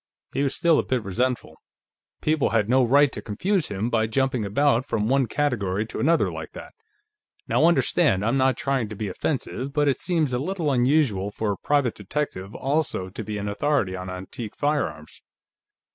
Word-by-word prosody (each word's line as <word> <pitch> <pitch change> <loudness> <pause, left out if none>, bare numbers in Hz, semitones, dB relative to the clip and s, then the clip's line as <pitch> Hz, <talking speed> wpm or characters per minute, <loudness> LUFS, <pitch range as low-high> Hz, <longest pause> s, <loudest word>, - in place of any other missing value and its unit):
He - - 0
was 140 -1 0
still 170 -2 +3
a - - +1
bit 125 -3 -1
resentful; 125 +6 -2 0.6
people 155 -2 +2
had 110 -3 +1
no 130 +2 +4
right 140 +3 +4
to - - -6
confuse 175 - -1
him 105 +4 -3
by 110 -1 +2
jumping 130 0 0
about 120 +4 +2
from 110 -5 -1
one 135 0 +2
category 110 -7 -1
to 115 - -7
another, 165 +3 +2
like - - -7
that. - - -10 0.7
"Now - - +3
understand, 160 - +2
I'm 115 +4 +1
not 130 -2 +2
trying 135 -6 -1
to 110 - -7
be 105 0 -4
offensive, 135 +4 -3
but 145 0 +2
it 135 - +1
seems 160 -7 0
a 125 - 0
little 165 0 -1
unusual 125 -6 +2
for 105 0 -2
a 100 - -3
private 145 -5 +1
detective 105 -2 -4
also 135 -9 -1
to 105 +4 -6
be 105 0 -4
an 100 0 -4
authority 100 -2 0
on 90 0 -6
antique 95 +4 -7
firearms." 145 - -2
125 Hz, 185 wpm, -24 LUFS, 105-145 Hz, 0.7 s, no